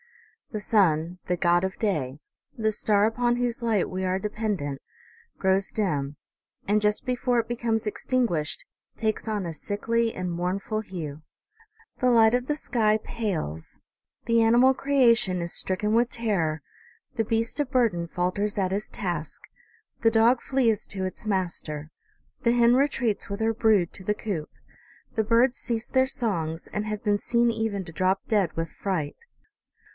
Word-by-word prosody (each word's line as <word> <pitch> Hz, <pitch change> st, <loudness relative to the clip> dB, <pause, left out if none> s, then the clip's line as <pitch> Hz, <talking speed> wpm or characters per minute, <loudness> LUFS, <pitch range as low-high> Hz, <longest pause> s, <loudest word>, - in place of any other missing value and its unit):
The 215 Hz, -, -3 dB
sun, 180 Hz, -5 st, +2 dB
the 180 Hz, -1 st, 0 dB
god 175 Hz, +1 st, +3 dB
of 190 Hz, 0 st, -2 dB
day, 150 Hz, -, -1 dB, 0.4 s
the 220 Hz, -1 st, +1 dB
star 205 Hz, -1 st, +2 dB
upon 240 Hz, +2 st, +1 dB
whose 245 Hz, -1 st, -1 dB
light 225 Hz, -5 st, +1 dB
we 185 Hz, 0 st, -4 dB
are 185 Hz, 0 st, 0 dB
dependent, 205 Hz, -9 st, -3 dB, 0.6 s
grows 190 Hz, +1 st, +2 dB
dim; 145 Hz, -9 st, -1 dB, 0.5 s
and, 210 Hz, +1 st, +3 dB
just 210 Hz, +4 st, +1 dB
before 250 Hz, -1 st, +1 dB
it 225 Hz, -, -2 dB
becomes 230 Hz, -2 st, -1 dB
extinguished, 210 Hz, -, -1 dB, 0.3 s
takes 220 Hz, 0 st, -1 dB
on 210 Hz, -4 st, -1 dB
a 165 Hz, -, -4 dB
sickly 230 Hz, +6 st, -1 dB
and 185 Hz, -1 st, -3 dB
mournful 185 Hz, +5 st, -2 dB
hue. 160 Hz, -7 st, -6 dB, 0.8 s
The 255 Hz, -, +4 dB
light 225 Hz, -2 st, +6 dB
of 250 Hz, +1 st, +1 dB
the 295 Hz, -, +1 dB
sky 220 Hz, -7 st, +1 dB
pales, 170 Hz, -, -4 dB, 0.5 s
the 230 Hz, -1 st, +3 dB
animal 240 Hz, +4 st, +5 dB
creation 240 Hz, -9 st, +3 dB
is 170 Hz, 0 st, -3 dB
stricken 210 Hz, +3 st, 0 dB
with 235 Hz, +1 st, +3 dB
terror, 175 Hz, -, -1 dB, 0.5 s
the 225 Hz, -, +1 dB
beast 230 Hz, +5 st, -1 dB
of 275 Hz, -2 st, -3 dB
burden 220 Hz, -10 st, +2 dB
falters 185 Hz, +5 st, -1 dB
at 190 Hz, -2 st, +1 dB
his 200 Hz, +2 st, -2 dB
task, 175 Hz, -6 st, -4 dB, 0.6 s
the 225 Hz, -, +4 dB
dog 230 Hz, +2 st, +4 dB
flees 240 Hz, -6 st, +1 dB
to 190 Hz, -1 st, -3 dB
its 185 Hz, -, -6 dB
master, 170 Hz, -6 st, -2 dB, 0.5 s
the 235 Hz, -, +4 dB
hen 240 Hz, 0 st, +5 dB
retreats 255 Hz, -7 st, 0 dB
with 200 Hz, +1 st, -4 dB
her 225 Hz, 0 st, +1 dB
brood 215 Hz, -6 st, +2 dB
to 190 Hz, -, -7 dB
the 210 Hz, +2 st, 0 dB
coop, 190 Hz, -9 st, -4 dB, 0.7 s
the 220 Hz, -, +2 dB
birds 235 Hz, +4 st, +3 dB
cease 235 Hz, -1 st, -2 dB
their 260 Hz, 0 st, +3 dB
songs, 170 Hz, -11 st, -2 dB
and 210 Hz, +1 st, -2 dB
have 210 Hz, -1 st, -4 dB
been 205 Hz, -2 st, +2 dB
seen 235 Hz, +1 st, +2 dB
even 220 Hz, -4 st, -2 dB
to 165 Hz, -, -10 dB
drop 185 Hz, +4 st, +1 dB
dead 200 Hz, -7 st, +2 dB
with 165 Hz, -1 st, -2 dB
fright. 175 Hz, -7 st, -3 dB
210 Hz, 160 wpm, -26 LUFS, 180-230 Hz, 0.8 s, light